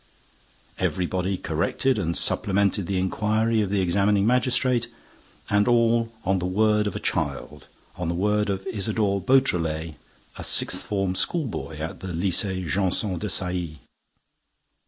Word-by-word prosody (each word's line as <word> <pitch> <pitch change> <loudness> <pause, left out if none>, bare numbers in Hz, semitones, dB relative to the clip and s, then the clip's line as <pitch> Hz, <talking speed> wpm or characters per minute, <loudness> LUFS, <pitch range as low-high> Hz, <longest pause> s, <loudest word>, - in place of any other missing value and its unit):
Everybody 95 +1 -1
corrected 90 - 0
and 85 -3 -1
supplemented 100 -1 +2
the 95 - -1
inquiry 110 +4 +1
of 100 - -1
the 100 -1 +1
examining 100 +3 +2
magistrate; 125 0 +1 0.6
and 105 +1 +2
all 115 -1 +3
on 95 +1 +2
the 90 - -2
word 105 +2 +2
of 100 - -4
a - - -2
child, 70 -1 -3 0.3
on 90 - -3
the 85 - -1
word 105 +3 +1
of 95 -1 -3
Isidore 100 -1 -1
Beautrelet, 85 - +1 0.4
a - - -6
sixth - - +1
form 95 -3 -1
schoolboy 115 - -1
at 80 +1 -5
the 95 - -7
Lycée 95 +1 0
Janson 95 +1 0
de 105 - -3
Sailly! 90 -4 -1
100 Hz, 135 wpm, -24 LUFS, 90-110 Hz, 0.6 s, all